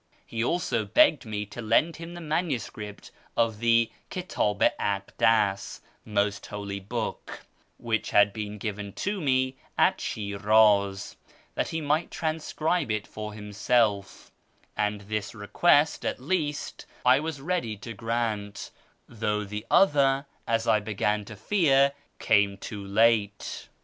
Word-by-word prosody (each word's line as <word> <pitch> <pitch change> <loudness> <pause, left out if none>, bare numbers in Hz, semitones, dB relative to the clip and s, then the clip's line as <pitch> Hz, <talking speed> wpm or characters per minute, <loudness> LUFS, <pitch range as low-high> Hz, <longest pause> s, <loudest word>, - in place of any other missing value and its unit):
He 115 0 -3
also 120 -6 0
begged 115 +5 +4
me 105 -1 -3
to 105 +4 -8
lend 120 +9 +2
him 165 +1 -8
the 175 - -8
manuscript 145 - -3 0.3
of 115 -2 +1
the 115 0 +3 0.2
Kitdl 140 - -2
i - - +5 0.3
Akdas 100 -1 +1
(" - - -34
Most 100 -1 -1
Holy 100 -1 -5
Book") 110 +3 -5 0.4
which 115 -2 -2
had 105 -1 +4
been 105 -1 -5
given 105 -1 -5
to 200 -1 -3
me 130 -2 +1 0.2
at - - +3
Shiraz, 100 -1 +2 0.4
that - - -1
he 160 - -3
might 150 +3 0
transcribe 160 0 -1
it 105 -1 -1
for 105 0 -7
himself, 105 -1 0 0.4
and 105 0 -1
this 105 +1 -4
request, 145 +8 +2
at - - -2
least, 150 0 -2 0.2
I 125 +2 +6
was 155 -1 -4
ready 135 - -2
to 115 +2 -8
grant, 110 -2 -3 0.4
though 105 -2 -2
the 105 +1 -6
other, 140 -6 +4 0.2
as 115 0 0
I 110 -2 +4
began 105 0 -1
to 105 - -9
fear, 140 - +3 0.3
came 100 -2 +2
too 100 +1 -7
late. 105 0 +1
110 Hz, 135 wpm, -27 LUFS, 105-140 Hz, 0.4 s, I